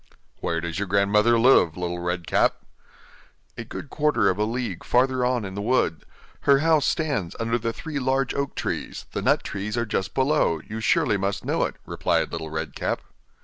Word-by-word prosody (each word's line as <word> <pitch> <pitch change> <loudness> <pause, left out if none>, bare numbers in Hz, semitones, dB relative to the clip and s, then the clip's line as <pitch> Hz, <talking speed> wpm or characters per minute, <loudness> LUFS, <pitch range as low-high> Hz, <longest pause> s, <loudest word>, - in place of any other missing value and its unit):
'Where 85 - -1
does 85 +1 -4
your 100 - -2
grandmother 105 +4 +3
live, 115 -9 +5
Little 90 -1 -3
Red 90 0 -2
Cap?' - - +1 0.9
'A - - -6
good 140 - -8
quarter 145 -10 +2
of 95 - -5
a 105 - +2
league 120 +2 -3
farther 130 +1 +2
on 125 -3 +1
in 95 - -6
the 100 - -4
wood; 105 -9 +1 0.3
her 140 -1 +4
house 155 0 +3
stands 140 - -1
under 115 +1 0
the 115 0 -1
three 150 +4 -5
large 130 -1 0
oak 140 -1 -2
trees, - - -4
the - - -3
nut - - +2
trees 105 +3 -4
are 120 - +1
just 100 -3 -2
below; 130 - +2
you 110 +1 -5
surely 105 -1 +2
must 100 0 -2
know - - +1
it,' - - -5
replied - - 0
Little 80 -1 -5
Red 80 0 -4
Cap. - - -2
110 Hz, 190 wpm, -24 LUFS, 95-130 Hz, 0.9 s, live